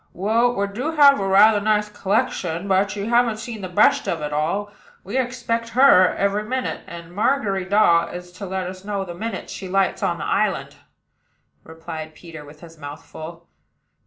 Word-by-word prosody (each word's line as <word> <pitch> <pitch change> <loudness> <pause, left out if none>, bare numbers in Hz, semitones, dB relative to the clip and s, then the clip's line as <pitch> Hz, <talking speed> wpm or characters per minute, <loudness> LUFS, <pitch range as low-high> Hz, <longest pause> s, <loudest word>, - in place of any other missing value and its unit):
"Well, 230 +6 +1
we 200 - 0
do 245 +11 -4
have 285 -4 +6
rather 200 +2 +5
a - - -8
nice 210 0 +1
collection; 200 -3 -2
but 195 +1 +1
you 200 +1 -4
haven't 235 -2 +2
seen 220 -1 -7
the 185 - -5
best 180 - +3
of 160 -3 -2
all. 195 +8 -2 0.3
We 200 +6 -7
expect 235 -2 -2
her 255 -9 +6
every 200 +1 0
minute; 255 +4 -3
and 170 0 -10
Margery 205 -3 0
Daw 185 -4 +3
is 180 0 -9
to 185 +2 -8
let 190 0 -3
us 185 +1 -8
know 200 -1 -3
the 175 - -7
minute 225 +6 -5
she 190 - -7
lights 195 0 0
on - - 0
the - - -5
island," - - -1 0.9
replied 160 -1 -8
Peter, 165 -3 -11
with 150 +1 -15
his 165 -2 -14
mouth 145 -1 -9
full. 165 +2 -10
195 Hz, 180 wpm, -22 LUFS, 175-220 Hz, 0.9 s, have